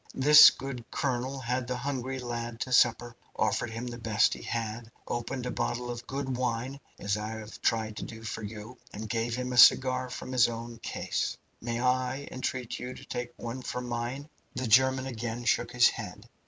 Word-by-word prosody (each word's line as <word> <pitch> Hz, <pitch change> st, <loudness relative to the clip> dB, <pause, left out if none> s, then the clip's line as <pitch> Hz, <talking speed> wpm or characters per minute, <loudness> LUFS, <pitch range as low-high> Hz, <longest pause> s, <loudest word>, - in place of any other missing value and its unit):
This 150 Hz, +3 st, +10 dB
good 130 Hz, -3 st, -6 dB
colonel 130 Hz, -1 st, -2 dB
had 125 Hz, +1 st, -2 dB
the 125 Hz, 0 st, -2 dB
hungry 130 Hz, 0 st, -3 dB
lad 120 Hz, -2 st, -5 dB
to 130 Hz, -, -2 dB
supper, 120 Hz, -1 st, +3 dB, 0.2 s
offered 110 Hz, +2 st, 0 dB
him 115 Hz, +2 st, -5 dB
the 120 Hz, -1 st, -6 dB
best 110 Hz, -1 st, +3 dB
he -, -, -8 dB
had, 115 Hz, 0 st, -4 dB, 0.2 s
opened 125 Hz, +2 st, -3 dB
a 125 Hz, -, -2 dB
bottle 120 Hz, 0 st, -2 dB
of 120 Hz, 0 st, -7 dB
good 135 Hz, -2 st, -3 dB
wine, 125 Hz, +2 st, -2 dB, 0.2 s
as 100 Hz, +1 st, -1 dB
I 105 Hz, 0 st, -4 dB
have 110 Hz, -1 st, -9 dB
tried 110 Hz, -2 st, 0 dB
to -, -, -4 dB
do 110 Hz, 0 st, -9 dB
for 115 Hz, 0 st, -5 dB
you, 110 Hz, +3 st, -8 dB
and 110 Hz, +1 st, -6 dB
gave 115 Hz, +1 st, -1 dB
him 125 Hz, 0 st, -3 dB
a -, -, -2 dB
cigar 130 Hz, 0 st, +6 dB
from 125 Hz, -, -7 dB
his 125 Hz, -2 st, +4 dB
own 115 Hz, 0 st, -7 dB
case. -, -, -2 dB, 0.2 s
Might 120 Hz, 0 st, -2 dB
I 130 Hz, +2 st, 0 dB
entreat 130 Hz, -2 st, -3 dB
you 125 Hz, +1 st, -6 dB
to -, -, -12 dB
take 120 Hz, 0 st, -4 dB
one 120 Hz, +2 st, -5 dB
from 125 Hz, 0 st, -4 dB
mine?" 120 Hz, +4 st, -3 dB, 0.3 s
The 130 Hz, +1 st, -2 dB
German 130 Hz, +3 st, +4 dB
again 120 Hz, -1 st, -4 dB
shook -, -, +1 dB
his 120 Hz, -1 st, +6 dB
head. 105 Hz, 0 st, -8 dB
120 Hz, 195 wpm, -29 LUFS, 115-130 Hz, 0.3 s, This